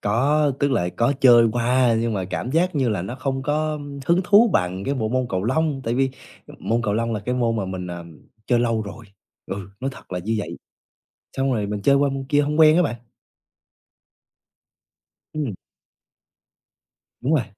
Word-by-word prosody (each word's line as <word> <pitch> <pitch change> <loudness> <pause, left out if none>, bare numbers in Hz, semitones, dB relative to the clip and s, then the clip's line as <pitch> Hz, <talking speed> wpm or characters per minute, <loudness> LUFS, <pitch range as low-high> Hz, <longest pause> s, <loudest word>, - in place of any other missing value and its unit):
Có. 145 +8 +2
Tức 140 0 +2
là 90 -9 +1
có 120 +4 +2
chơi 120 -3 +7
qua 120 0 +2
nhưng 115 -1 -1
mà 95 - -2
cảm 95 +7 -4
giác 170 +4 +1
như 135 -4 +1
là 105 -6 -1
nó 100 +7 -5
không 135 0 -3
có 150 +1 -1 0.3
hứng 175 +2 +3
thú 205 +4 +5
bằng 90 +2 0
cái 140 - -1
bộ 110 -5 -1
môn 130 +2 0
cầu 95 0 -2
lông. 145 +3 0
Tại 115 - -1
vì 135 +1 +1 0.5
môn 115 +1 -1
cầu 105 -3 0
lông 115 +1 -1
là 105 - -2
cái 125 +4 -2
môn 115 -2 0
mà 100 - -1
mình, 95 -1 -5
à, 85 -1 -7 0.4
chơi 120 - +3
lâu 115 -2 +1
rồi. 110 +3 -9 0.4
Ừ. 95 0 -6
Nói 135 +1 -2
thật 95 - -13
là 90 - -2
như 110 +6 -2
vậy. 85 -4 -5 0.8
Xong 135 -1 +1
rồi 105 -3 -1
mình 105 -1 -4
chơi 140 +6 +4
qua 140 0 +3
môn 135 0 -4
kia 145 -1 +3
hông 150 +2 -1
quen 155 0 +7
á 180 - +4
bạn. 145 -7 -1 2.4
Ừm. 145 -9 -3 1.7
Đúng 140 +6 +1
rồi. 135 - +2
120 Hz, 195 wpm, -22 LUFS, 105-140 Hz, 2.4 s, chơi